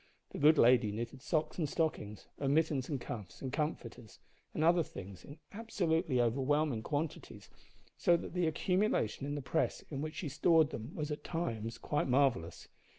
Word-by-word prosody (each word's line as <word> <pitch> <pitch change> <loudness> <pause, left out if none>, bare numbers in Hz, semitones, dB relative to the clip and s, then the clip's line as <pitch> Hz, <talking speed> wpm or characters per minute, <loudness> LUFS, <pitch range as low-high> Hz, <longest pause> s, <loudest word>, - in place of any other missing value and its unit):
The - - -6
good 150 +2 +6
lady 120 -4 +5
knitted 120 +5 -5
socks 155 +3 -1
and 155 -4 0
stockings, 110 - -2
and 140 0 +1
mittens 155 -5 +1
and 140 -4 -2
cuffs, 105 -6 -7
and 130 -1 -5
comforters, 125 -7 -4 0.3
and 155 - -1
other 170 +1 +5
things, 95 - -8
in 145 - -11
absolutely 170 - 0
overwhelming 135 +2 +1
quantities, 150 +5 -4 0.5
so 175 -1 +4
that - - -7
the 180 -2 +1
accumulation 170 - 0
in 145 - -2
the 145 - -4
press 160 +6 -1
in 140 -1 -3
which 155 0 -4
she 165 - -4
stored 160 +2 +3
them 115 +7 -7
was 150 -1 -3
at 150 - -4
times 115 -10 -3
quite 150 - -1
marvellous. 125 -11 +1
145 Hz, 170 wpm, -33 LUFS, 120-160 Hz, 0.5 s, good